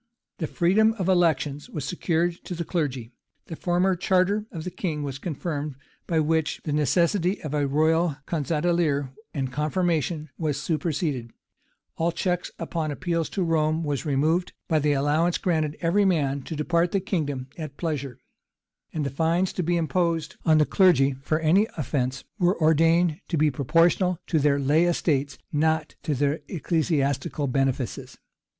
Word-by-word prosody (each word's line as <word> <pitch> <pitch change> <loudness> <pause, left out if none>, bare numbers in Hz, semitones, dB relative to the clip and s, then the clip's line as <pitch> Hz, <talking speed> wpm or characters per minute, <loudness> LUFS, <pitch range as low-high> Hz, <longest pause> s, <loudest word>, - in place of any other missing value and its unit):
The 160 - -1
freedom 210 +8 +3
of 190 -5 -3
elections 155 -6 +1
was 150 - -5
secured 170 -1 -1
to 180 - -5
the 170 0 -4
clergy: 135 -10 -2 0.3
the 165 - -7
former 180 +3 +1
charter 190 +4 +1
of 160 -3 -6
the 180 - -5
king 155 -6 -3
was 135 -1 -5
confirmed, 150 -2 -4 0.3
by 165 -2 +1
which 160 0 0
the 150 - -2
necessity 170 - +2
of 150 -2 -4
a 145 -1 +1
royal 160 +2 +2
conge 155 -6 -2
d'élire 155 -4 +1 0.2
and 135 -3 -2
confirmation 155 0 -1
was 150 -4 -1
superseded: 150 -5 -2 0.7
all 165 +1 +1
check 180 +1 -1
upon 160 -2 -3
appeals 165 +2 -2
to 190 - -1
Rome 160 -1 +1
was 145 -3 -2
removed, 155 +5 +1
by 160 -2 +2
the 150 0 +2
allowance 150 +5 +2
granted 155 -4 -1
every 180 +4 +3
man 140 -7 +1
to 160 - -5
depart 170 +3 +1
the 195 - +3
kingdom 145 -9 -2
at 155 -4 -7
pleasure: 140 -7 -3 0.7
and 155 -3 -2
the 140 - -2
fines 165 +6 +1
to - - -2
be 175 +1 +1
imposed 165 -1 0
on 155 -1 +4
the 150 - +4
clergy, 140 -9 +4
for 155 +3 0
any 180 +7 +4
offence, 135 -2 -2 0.2
were 180 0 +2
ordained 165 +1 +3
to 170 - -1
be 150 0 +3
proportional 165 +6 +2
to 160 - +1
their 140 -1 +3
lay 145 +5 +3
estates, 145 -5 0 0.2
not 160 +1 +1
to 150 - -1
their 145 +3 0
ecclesiastical 150 -4 0
benefices. 135 -2 -2
160 Hz, 160 wpm, -25 LUFS, 145-175 Hz, 0.7 s, on